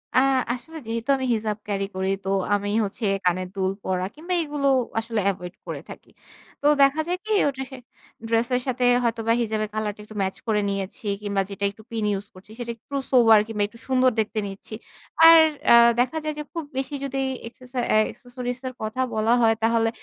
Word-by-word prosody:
আ - - +7 0.3
আসলে 320 +6 -9
যেহেতু 230 +3 -4
আমি 260 - -2
হিজাব 215 -1 -2
ক্যারি 195 -1 -1
করি, 190 0 -1
তো 190 - -3 0.3
আমি 205 0 -2
হচ্ছে 210 +3 -4 0.2
কানের 180 +1 +1
দুল 190 -1 0
পরা 185 -1 -1
কিংবা 340 +4 -4
এগুলো 290 -2 -1 0.3
আসলে 225 -1 -2
এভয়েড 180 -2 -5
করে - - -5
থাকি। - - -11 0.5
তো - - -6 0.2
দেখা 275 +3 +5
যায় 360 +1 0
কি? 435 - -4 0.2
ওটা 270 -1 -2
সে 265 - -8 0.5
ড্রেস 230 +1 +2
এর 250 - +1
সাথে 255 0 -1 0.2
হয়তোবা 230 -1 +1
হিজাবের 215 -2 -1
কলার 215 -1 -1
টা - - -29
একটু 215 0 -13
ম্যাচ 190 0 -1
করে 210 -2 +2
নিয়েছি 195 +2 -5 0.2
কিংবা 200 -1 0
যেটা 200 0 -6
একটু 220 +2 -17
পিন 225 -2 -2
ইউস 200 +1 -4
করছি 190 +3 -16
সেটা 235 -1 -3
একটু 280 +5 -10 0.2
সোবার 230 -4 +7
কিংবা 215 -2 -1
একটু 230 +2 -17
সুন্দর 255 -1 +3
দেখতে 220 0 0
নিচ্ছি। 195 +2 -10 0.5
আর 330 0 +10 0.3
অ্যা - - +8 0.2
দেখা 255 +6 +1
যায় 305 - -2
যে - - -3
খুব 335 -2 -3
বেশি 265 +1 -2
যদি 270 0 -3 0.3
এক্সেসা 250 +2 -8
অ্যা - - +4
অ্যাক্সেসরিজ 245 0 -6
এর 255 - -5
কথা 215 +4 -2
বলা 220 +1 +2
হয় 225 -1 +5
তাহলে 225 0 +3
225 Hz, 200 wpm, -24 LUFS, 205-255 Hz, 0.5 s, আর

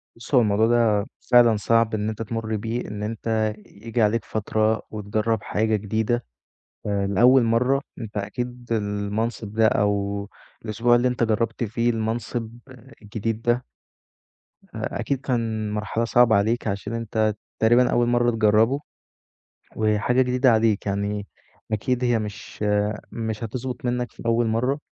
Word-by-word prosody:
بُص 120 +4 -3
هو 125 - +7
الموضوع 110 0 +3
ده 115 -4 +3 0.3
فعلًا 120 -3 +6
صعب 115 +2 +2
إن 105 0 -1
أنت 110 +1 -5
تمُر 110 0 -3
بيه، 115 +3 -3
إن 105 0 -5
أنت 110 0 -1
ييجي 115 +3 -4
عليك 110 0 +2
فترة 110 +1 0
وتجرّب 110 +1 -1
حاجة 110 +1 0
جديدة 110 +3 -1 0.6
آآ 100 -1 0
لأول 120 +6 +5
مَرّة 125 +4 +2 0.2
أنت 110 -3 -6
أكيد 120 +4 -5
المنصب 105 +1 -2
ده 110 0 +5
أو 100 -1 0 0.4
الأسبوع 115 +3 +2
اللي 120 +1 +3
أنت 125 -1 0
جرّبت 115 +1 0
فيه 115 +2 0
المنصب 115 0 -2 0.5
الجديد 110 +1 -3
ده 120 +1 +1 1.1
أ - - -3
أكيد 135 -2 -1
كان 115 -5 -2
مرحلة 105 +2 -1
صعبة 115 -1 +4
عليك 110 +4 0
عشان 100 +2 -3
أنت 110 -2 0 0.2
تقريبًا 120 +3 +4
أول 120 - +2
مَرّة 120 0 +3
تجرّبه 110 +4 +3 1.0
وحاجة 110 +4 +2
جديدة 125 0 +3
عليك 110 -2 +2
يعني 100 +1 -2 0.5
أكيد 125 +4 0
هي 120 -2 +2
مش، 105 0 -6 0.5
مش 110 -1 -4
هتظبط 125 +3 -5
منّك 125 0 -1
في - - -12
أول 115 0 +2
مَرّة، 125 +6 0
110 Hz, 140 wpm, -24 LUFS, 105-120 Hz, 1.1 s, هو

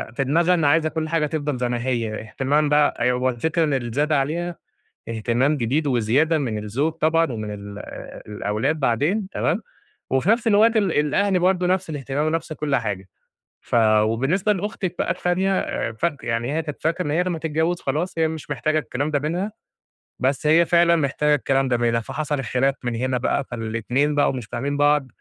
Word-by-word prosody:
في 135 - +1
دماغها 165 +6 +3
إن 165 -4 +1
عايزة 155 +2 +3
كُلّ 155 +1 -3
حاجة 165 -2 +1
تفضَل 150 -3 -2
زي 125 0 -1
ما 120 -1 -2
هي، 115 -4 -1
اهتمام 140 +7 0
بقى 150 0 +4
أيوه 125 0 +2
هو 130 +1 +2
الفكرة 160 +7 0
اللي 135 -6 -1
زاد 150 +3 0
عليها 160 +5 0 0.5
اهتمام 120 +6 +1
جديد 140 +5 0
وزيادة 135 +6 +2
من 115 -7 -2
الزوج 135 +10 -1
طبعًا 165 -2 +1
ومن 110 -2 -5
ال 100 0 -9 0.5
الأولاد 105 +8 -2
بعدين، 150 - +1
تمام، - - 0 0.5
وفي 135 +9 +2
نَفْس 230 +1 +2
الوقت 225 +2 +4
ال 200 -5 +2
الأهل 180 +7 +2
برضه 180 0 +2
نَفْس 185 -1 0
الاهتمام 145 0 -2
ونَفْس 160 0 -2
كُلّ 150 -2 -1
حاجة. 100 -5 -3 0.6
ف - - -2 0.3
وبالنسبة 135 - +1
لأختِك 190 -2 -3
بقى - - +1
التانية 185 -7 0
فاك 145 +6 -2
يعني 120 +3 -1
هي 160 - 0
كانت 150 -3 -7
فاكرة 165 +3 0
إن 145 - -1
هي 170 +4 +2
لمّا 175 -3 -2
تتجوز 160 +2 -1
خلاص، 155 +6 -2
هي 160 -1 +3
مش 160 -2 -7
محتاجة 150 +3 0
الكلام 145 +2 -3
ده 145 - +1
منها، 175 +8 -2 0.7
بس 135 +3 0
هي 165 +3 +5
فعلًا 170 0 +4
محتاجة 150 -1 +2
الكلام 135 -1 +1
ده 125 -2 +1
منها. 115 -1 +1
فحصَل 150 +4 -3
الخلاف 135 +2 0
من 120 -1 -2
هنا 130 +2 0
بقى، 135 +3 0
فالاتنين 120 +5 -1
بقوا 145 - +3
مش 125 -4 -5
فاهمين 135 +6 -3
بعض 145 -1 +3
145 Hz, 185 wpm, -22 LUFS, 125-165 Hz, 0.7 s, هي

